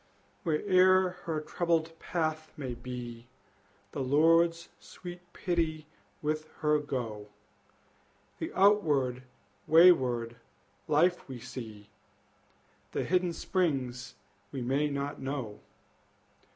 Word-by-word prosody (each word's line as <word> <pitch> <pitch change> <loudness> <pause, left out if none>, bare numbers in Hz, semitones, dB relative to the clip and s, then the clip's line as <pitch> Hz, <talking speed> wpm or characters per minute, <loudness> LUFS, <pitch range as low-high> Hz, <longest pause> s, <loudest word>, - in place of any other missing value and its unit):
Where'er 185 +2 +4 0.2
her 160 -2 -1
troubled 165 0 -1
path 155 -2 -2
may 130 -4 -4
be, 120 -1 -7 0.6
The - - -5
Lord's 165 +5 +3
sweet 175 -1 -10
pity 165 -4 -1 0.4
with 155 +1 -2
her 150 -1 +3
go! 115 -8 -4 1.1
The - - -4
outward 150 -11 +3 0.5
wayward 130 -9 +5 0.5
life 170 +2 +2
we 130 -2 -6
see, 110 -4 -9 1.0
The - - 0
hidden 180 -1 +1
springs 135 -10 -2 0.4
we 130 -3 -4
may 140 +4 +1
not 140 0 -4
know. 130 -6 -4
150 Hz, 95 wpm, -30 LUFS, 125-170 Hz, 1.1 s, wayward